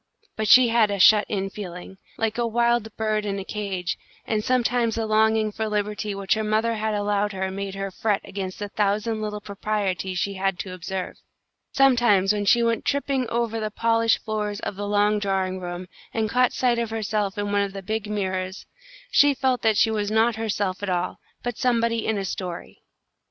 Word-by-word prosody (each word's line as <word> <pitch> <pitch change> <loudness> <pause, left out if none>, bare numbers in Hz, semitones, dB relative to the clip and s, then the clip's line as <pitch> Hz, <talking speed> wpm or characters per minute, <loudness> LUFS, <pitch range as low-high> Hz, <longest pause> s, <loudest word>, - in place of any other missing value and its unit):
But 215 0 -2
she 250 +3 +8
had 225 -2 +4
a 200 - -1
shut 210 +2 +6
in 195 -2 -2
feeling, 190 -1 -8 0.2
like 225 +1 -1
a 235 - +1
wild 235 0 +2
bird 215 -1 0
in 200 -1 -2
a 195 - -4
cage, 195 -4 -3 0.3
and 215 -1 -1
sometimes 245 -2 +1
the 225 -1 -1
longing 220 0 +2
for 220 +1 -3
liberty 210 0 -2
which 195 -1 +1
her 220 - -1
mother 215 +2 +1
had 220 -1 -1
allowed 205 0 0
her 190 0 -2
made 195 0 -5
her 195 0 -4
fret 205 +1 0
against 190 -1 -5
the 205 - -4
thousand 215 +2 0
little 210 -1 -4
proprieties 195 -3 -2
she 200 +3 -1
had 195 -1 -1
to 185 0 -6
observe. 185 +1 -5 0.5
Sometimes 240 -8 +4
when 205 -1 -2
she 235 +4 +4
went 230 -1 +1
tipping 275 -3 0
over 230 -1 -1
the 215 -1 -2
polished 230 +1 +1
floors 210 -1 -2
of - - -4
the 205 +1 -4
long 205 +1 +2
drawing 190 -2 -1
room, 175 0 -5 0.3
and 220 -2 0
caught 250 -1 +3
sight 245 -2 +1
of 230 -1 -1
herself 210 -3 -2
in 205 0 -2
one 205 0 +2
of 200 -1 -2
the 195 -1 -7
big 215 +2 -3
mirrors, 190 -2 -3 0.5
she 285 -1 +5
felt 260 -1 +1
that 220 -2 +2
she 225 - +4
was 210 -2 -1
not 220 +1 +3
herself 205 -4 -2
at 205 - -3
all, 180 0 -1 0.2
but 245 -2 -4
somebody 230 -2 +1
in 220 - +1
a 195 - -2
story. 180 -2 -6
210 Hz, 200 wpm, -24 LUFS, 195-225 Hz, 0.5 s, she